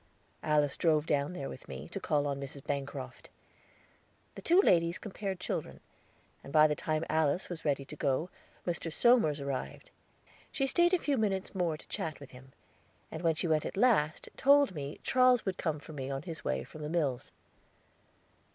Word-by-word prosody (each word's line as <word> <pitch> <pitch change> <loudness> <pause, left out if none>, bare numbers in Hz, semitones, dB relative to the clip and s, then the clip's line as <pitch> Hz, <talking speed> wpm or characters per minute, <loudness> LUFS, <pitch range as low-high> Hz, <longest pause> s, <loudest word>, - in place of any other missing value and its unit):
Alice 150 -2 +1
drove 155 -3 +2
down 145 +3 0
there 140 -6 -5
with - - -10
me, - - -7
to - - -5
call 145 -1 +1
on 140 -1 -2
Mrs. 140 0 -8
Bancroft. 140 -2 -5 1.0
The - - -9
two 345 +3 +4
ladies 170 - +4
compared 195 -2 -5
children, - - -4 0.6
and 140 - -10
by 155 0 +7
the 150 - +3
time 155 +2 -1
Alice 160 +2 +1
was 175 -2 -6
ready 140 -2 0
to 150 - -9
go, 145 +5 0 0.3
Mr. 170 -2 -2
Somers 225 - +4
arrived. 140 -2 -5 0.6
She 270 - 0
staid 345 +6 +4
a - - +3
few 290 -5 0
moments 195 -3 -1
more 175 -5 0
to - - -16
chat 155 -2 -4
with 140 - -12
him, 130 +1 -14 0.6
and 160 - -5
when 165 -2 +2
she 170 - -1
went 155 -2 +2
at - - -5
last, 195 -10 +2
told 280 -4 +5
me 145 -2 -6
Charles 255 -2 +4
would 190 -2 -2
come 160 -3 -1
for 155 - -11
me 135 -2 -5
on 135 +1 -3
his 165 -1 -7
way 65 0 -1
from 155 - -11
the 150 - -4
mills. 150 -7 -1
155 Hz, 185 wpm, -31 LUFS, 140-190 Hz, 1.0 s, by